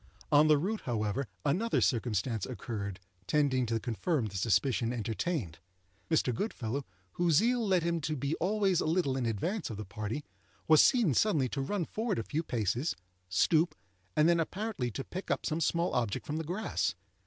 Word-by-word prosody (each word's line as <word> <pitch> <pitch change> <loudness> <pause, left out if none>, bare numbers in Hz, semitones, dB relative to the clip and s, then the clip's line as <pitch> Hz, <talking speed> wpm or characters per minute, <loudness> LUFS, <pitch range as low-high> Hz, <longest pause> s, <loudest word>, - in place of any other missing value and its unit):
On 150 +1 +6
the 155 -1 +6
route, 205 +9 -2
however, 115 +2 -1 0.2
another 200 +11 +2
circumstance 115 -3 0
occurred 105 -5 -5 0.3
tending 135 -3 +2
to 115 0 0
confirm 125 - -1
the 100 -2 -6
suspicion 115 +4 +1
entertained. 115 - -2 0.5
Mr. 155 -6 +2
Goodfellow, 135 - -3 0.2
whose 170 - +2
zeal 235 +6 +3
led 185 -3 +3
him 170 -1 0
to 155 +1 -1
be 140 +2 -2
always 195 -1 +2
a - - -1
little 160 -5 +1
in 130 -3 -1
advance 170 - -2
of 110 - -5
the 110 - -5
party, 105 +9 -4 0.4
was 155 -1 +8
seen 235 - +4
suddenly 150 - +2
to 135 - -2
run 175 +5 -1
forward 225 +5 -2
a 115 - -1
few 155 +7 -2
paces, 120 - -1 0.3
stoop, 160 - +3 0.4
and 155 - +5
then 170 0 +4
apparently 185 - -2
to 135 +4 -5
pick 185 +7 -7
up - - 0
some 160 +1 -1
small 170 +3 +1
object 115 -5 -1
from 150 - -3
the 160 - -2
grass. 180 +8 -1
145 Hz, 175 wpm, -31 LUFS, 115-170 Hz, 0.5 s, was